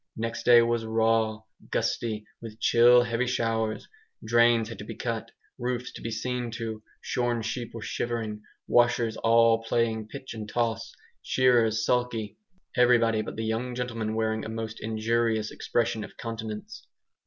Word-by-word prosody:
Next 115 Hz, 0 st, -3 dB
day 120 Hz, -1 st, +8 dB
was 115 Hz, -1 st, 0 dB
raw, 110 Hz, -1 st, +1 dB, 0.3 s
gusty, 110 Hz, -2 st, -1 dB, 0.2 s
with 110 Hz, -1 st, -9 dB
chill 120 Hz, +1 st, +6 dB
heavy 120 Hz, +1 st, -1 dB
showers; 115 Hz, -3 st, -1 dB, 0.4 s
drains 120 Hz, 0 st, +4 dB
had 115 Hz, -, -8 dB
to -, -, -6 dB
be -, -, -7 dB
cut, 115 Hz, -1 st, -3 dB, 0.3 s
roofs 125 Hz, 0 st, -2 dB
to -, -, -10 dB
be 115 Hz, -, -4 dB
seen 120 Hz, +2 st, -3 dB
to; 115 Hz, -2 st, -5 dB, 0.2 s
shorn 120 Hz, -2 st, -1 dB
sheep 120 Hz, +1 st, -4 dB
were 115 Hz, -, -6 dB
shivering, 110 Hz, -3 st, -3 dB, 0.3 s
washers 120 Hz, -2 st, +3 dB
all 115 Hz, 0 st, +4 dB
playing 115 Hz, -1 st, 0 dB
pitch 130 Hz, +3 st, -8 dB
and 110 Hz, -2 st, -7 dB
toss, 115 Hz, 0 st, -1 dB, 0.3 s
shearers 115 Hz, -4 st, +3 dB
sulky; 120 Hz, -4 st, -1 dB, 0.4 s
everybody 115 Hz, -3 st, +4 dB
but 110 Hz, -, -6 dB
the 110 Hz, -, -3 dB
young 120 Hz, +3 st, -2 dB
gentlemen 115 Hz, -3 st, -3 dB
wearing 110 Hz, 0 st, 0 dB
a -, -, -5 dB
most 110 Hz, 0 st, -5 dB
injured 110 Hz, +1 st, +1 dB
expression 115 Hz, -2 st, -1 dB
of -, -, -11 dB
countenance. 115 Hz, -, -6 dB
115 Hz, 150 wpm, -27 LUFS, 110-120 Hz, 0.4 s, day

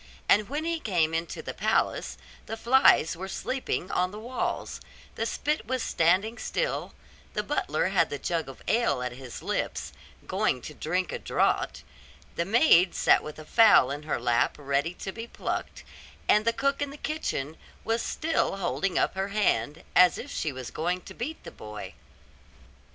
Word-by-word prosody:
And 210 Hz, +1 st, +4 dB
when 300 Hz, +3 st, -2 dB
he 335 Hz, 0 st, -1 dB
came 170 Hz, -, +1 dB
into 165 Hz, +1 st, -3 dB
the -, -, -5 dB
palace, -, -, 0 dB, 0.3 s
the 225 Hz, -, -4 dB
flies 235 Hz, -, +5 dB
were 190 Hz, +3 st, -6 dB
sleeping 250 Hz, -3 st, -3 dB
on 180 Hz, 0 st, +1 dB
the 205 Hz, -, -9 dB
walls; 245 Hz, +3 st, -3 dB, 0.3 s
the -, -, -2 dB
spit 300 Hz, -6 st, -2 dB
was 255 Hz, -1 st, -1 dB
standing 190 Hz, +8 st, +2 dB
still; -, -, -2 dB, 0.4 s
the -, -, 0 dB
butler -, -, 0 dB
had -, -, +2 dB
the -, -, -3 dB
jug 165 Hz, -5 st, -2 dB
of 135 Hz, -, -12 dB
ale 230 Hz, -, +2 dB
at 125 Hz, -, -2 dB
his 125 Hz, -1 st, -9 dB
lips, -, -, -2 dB, 0.3 s
going 125 Hz, -, 0 dB
to 150 Hz, -, -7 dB
drink 180 Hz, +5 st, -1 dB
a -, -, -4 dB
draught; -, -, 0 dB, 0.5 s
the 170 Hz, -, 0 dB
maid 195 Hz, -, +5 dB
sat -, -, +4 dB
with 150 Hz, -, -8 dB
a 155 Hz, -, -10 dB
fowl 215 Hz, -, +6 dB
in 145 Hz, +1 st, -4 dB
her 155 Hz, -4 st, -2 dB
lap 120 Hz, 0 st, +2 dB
ready 145 Hz, +4 st, -1 dB
to 190 Hz, -, -5 dB
be 225 Hz, +3 st, -7 dB
plucked; -, -, -4 dB, 0.4 s
and 210 Hz, +1 st, +4 dB
the 230 Hz, -, +4 dB
cook 275 Hz, +3 st, 0 dB
in 285 Hz, -, -1 dB
the 285 Hz, -, -9 dB
kitchen 160 Hz, -, -3 dB, 0.3 s
was 225 Hz, +1 st, 0 dB
still 320 Hz, -9 st, 0 dB
holding 195 Hz, 0 st, -1 dB
up -, -, +2 dB
her 190 Hz, +1 st, -2 dB
hand, 200 Hz, -6 st, 0 dB
as 180 Hz, -1 st, +6 dB
if 285 Hz, -, -7 dB
she 155 Hz, -, -2 dB
was 130 Hz, -2 st, -7 dB
going 180 Hz, +3 st, -1 dB
to -, -, -11 dB
beat 300 Hz, +7 st, -5 dB
the -, -, -9 dB
boy. 105 Hz, -1 st, -8 dB
185 Hz, 180 wpm, -27 LUFS, 155-235 Hz, 0.5 s, fowl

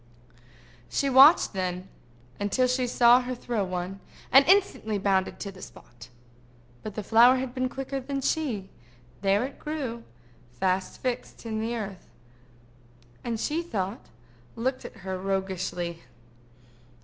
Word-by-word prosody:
She 275 Hz, -1 st, 0 dB
watched 270 Hz, +2 st, +7 dB
then 185 Hz, -1 st, -3 dB, 0.5 s
until 205 Hz, +6 st, +1 dB
she 250 Hz, 0 st, 0 dB
saw 240 Hz, 0 st, +6 dB
her 250 Hz, 0 st, -4 dB
throw 235 Hz, -3 st, -2 dB
one, 185 Hz, +1 st, -4 dB, 0.3 s
and 270 Hz, +1 st, +8 dB
instantly 370 Hz, -, +3 dB
bounded 195 Hz, -1 st, 0 dB
to 200 Hz, -, -4 dB
the 185 Hz, -1 st, -14 dB
spot. 120 Hz, 0 st, -13 dB, 0.7 s
But 215 Hz, -2 st, -7 dB
the 215 Hz, -, -4 dB
flower 235 Hz, +5 st, +6 dB
had 255 Hz, -1 st, -3 dB
been 255 Hz, -1 st, -1 dB
quicker 270 Hz, +1 st, -4 dB
than 275 Hz, +1 st, -4 dB
she: 250 Hz, -11 st, -1 dB, 0.5 s
there 200 Hz, +2 st, +2 dB
it 270 Hz, -, -9 dB
grew, 275 Hz, -7 st, -4 dB, 0.6 s
fast 185 Hz, +2 st, -1 dB
fixed 250 Hz, -1 st, -4 dB
in 220 Hz, -1 st, -3 dB
the 230 Hz, +2 st, -2 dB
earth, 200 Hz, -5 st, -7 dB, 1.1 s
and, 230 Hz, -2 st, -3 dB
she 310 Hz, +7 st, -1 dB
thought, 210 Hz, -, -4 dB, 0.5 s
looked 255 Hz, +3 st, -2 dB
at -, -, -9 dB
her 190 Hz, -1 st, -3 dB
roguishly. 185 Hz, -3 st, -3 dB
225 Hz, 135 wpm, -27 LUFS, 190-255 Hz, 1.1 s, and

